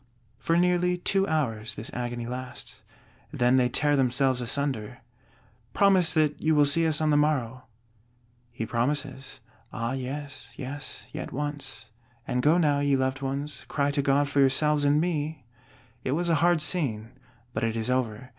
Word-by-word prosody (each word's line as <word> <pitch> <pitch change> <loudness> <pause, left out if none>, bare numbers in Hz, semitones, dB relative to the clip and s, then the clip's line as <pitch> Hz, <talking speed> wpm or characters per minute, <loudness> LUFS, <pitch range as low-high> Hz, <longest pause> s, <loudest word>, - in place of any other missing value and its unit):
For 165 - +1
nearly 180 0 +2
two 195 +2 +1
hours 115 - -1
this 110 - -5
agony 120 -1 -4
lasts; 125 +1 -6 0.5
then 125 +1 +3
they 125 -1 +3
tear 145 +4 +2
themselves 130 -1 +2
asunder. 125 -3 -1 0.8
"Promise 190 -5 +4
that 155 -2 +1
you 155 0 +2
will 145 -1 +5
see 160 +3 +3
us 155 -1 +1
on 155 -1 +2
the 145 - +4
morrow." 130 -5 0 0.9
He 115 -1 -4
promises: 135 +2 -2 0.3
Ah 115 +2 -3
yes, 140 +2 -6
yes; 145 +2 -7
yet - - -6
once; 135 -6 -5 0.4
and 125 - 0
go 150 +6 +4
now, 150 -4 +2
ye 145 -1 +2
loved 130 0 -1
ones; 140 +2 -4
cry 145 -1 0
to 140 0 0
God 140 +1 +2
for 140 0 0
yourselves 145 +2 +3
and 145 +1 +4
me! 155 -4 -2 0.6
It 130 - -1
was 170 +3 0
a 165 - +4
hard 170 -2 +3
scene, 120 -10 -1 0.4
but 110 - -2
it 115 0 0
is 115 +2 -1
over. 125 -1 -2
140 Hz, 165 wpm, -27 LUFS, 125-150 Hz, 0.9 s, will